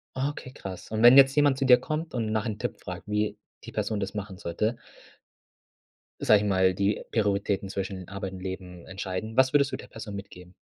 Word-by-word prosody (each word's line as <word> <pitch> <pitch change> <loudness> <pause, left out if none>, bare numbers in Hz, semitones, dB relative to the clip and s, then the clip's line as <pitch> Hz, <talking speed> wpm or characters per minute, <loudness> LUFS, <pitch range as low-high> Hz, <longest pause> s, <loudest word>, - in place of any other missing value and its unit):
Okay, 130 -1 -3
krass. 95 -7 -9
Und 110 0 -1
wenn 120 +3 +9
jetzt 135 0 +7
jemand 145 -2 +4
zu 135 - 0
dir 125 -1 +8
kommt 155 +4 -4
und 115 -3 -1
nach 110 -1 0
'nem 105 -1 -4
Tipp - - -4
fragt, - - -8
wie 105 0 0 0.3
die - - -9
Person 105 -2 -2
das 95 -1 -3
machen 100 -3 -6
sollte 105 +6 -2 1.4
sage 105 -1 +5
ich 105 - -1
mal, 95 -1 +3
die 100 +2 0
Prioritäten 100 -2 0
zwischen 95 -2 -4
Arbeit 100 -1 -5
und 95 - -8
Leben 90 -2 -7
entscheiden. 95 +3 -5
Was 130 0 +4
würdest 140 -1 +3
du - - -3
der - - -11
Person 105 -3 -8
mitgeben? 90 -2 -10
105 Hz, 200 wpm, -27 LUFS, 95-125 Hz, 1.4 s, wenn